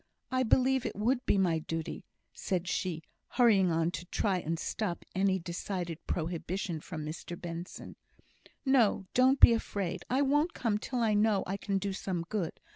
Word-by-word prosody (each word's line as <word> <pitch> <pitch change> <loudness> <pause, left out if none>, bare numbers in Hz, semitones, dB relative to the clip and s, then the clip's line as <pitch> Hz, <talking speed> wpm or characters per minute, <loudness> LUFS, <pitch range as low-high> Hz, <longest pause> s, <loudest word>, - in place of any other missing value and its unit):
I 255 0 +2
believe 255 +2 +3
it - - -4
would 240 +5 +1
be - - +3
my 175 -4 +2
duty," 165 +1 -5 0.3
said 180 -1 -2
she, 175 -3 -2 0.2
hurrying 210 -8 +4
on 165 +1 +1
to 175 - -6
try 190 +1 0
and 165 0 -2
stop 180 +1 -3
any 190 0 +2
decided 175 -1 -4
prohibition 170 +1 -3
from 155 -3 -6
Mr 170 +2 -6
Benson. 170 +1 -7 0.7
"No! 240 -7 +3
don't 260 +2 +4
be 235 - +9
afraid; 200 -5 -2
I 265 +3 +2
won't 295 +5 +2
come 215 -4 0
till 250 +2 -3
I 220 -2 +3
know 210 -1 +3
I 195 - -2
can 200 0 -1
do 195 0 -2
some 185 -3 -3
good. 195 -7 -3
195 Hz, 170 wpm, -31 LUFS, 170-225 Hz, 0.7 s, be